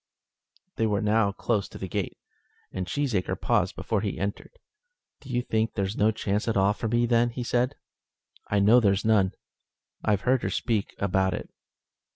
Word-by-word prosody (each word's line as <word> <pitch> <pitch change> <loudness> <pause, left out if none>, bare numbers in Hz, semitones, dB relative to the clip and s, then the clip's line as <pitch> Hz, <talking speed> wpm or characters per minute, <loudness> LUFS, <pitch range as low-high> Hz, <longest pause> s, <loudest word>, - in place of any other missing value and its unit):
They 115 - +2
were 105 -1 0
now 105 -1 +3
close 105 0 -1
to - - -10
the 95 - -5
gate, - - -3 0.5
and 95 -1 -4
Cheesacre 115 - -1
paused - - +1
before 110 -3 -1
he 105 -2 -3
entered. 100 - -5 0.6
"Do 140 - -14
you 125 -1 0
think 110 -2 -1
there's 100 0 -1
no 105 - +3
chance 105 -1 -1
at 115 - +1
all 100 +1 +4
for 115 - -4
me, 120 +2 +2
then?" 120 0 +2
said 125 +3 0 0.6
he. - - -4
"I - - +4
know 110 +5 +6
there's 100 -3 +2
none. 100 -4 +3 0.7
I've 105 -2 +2
heard 125 +1 +2
her - - -1
speak 110 -5 -1
about 95 -1 +1
it." - - -7
105 Hz, 180 wpm, -27 LUFS, 100-120 Hz, 0.7 s, know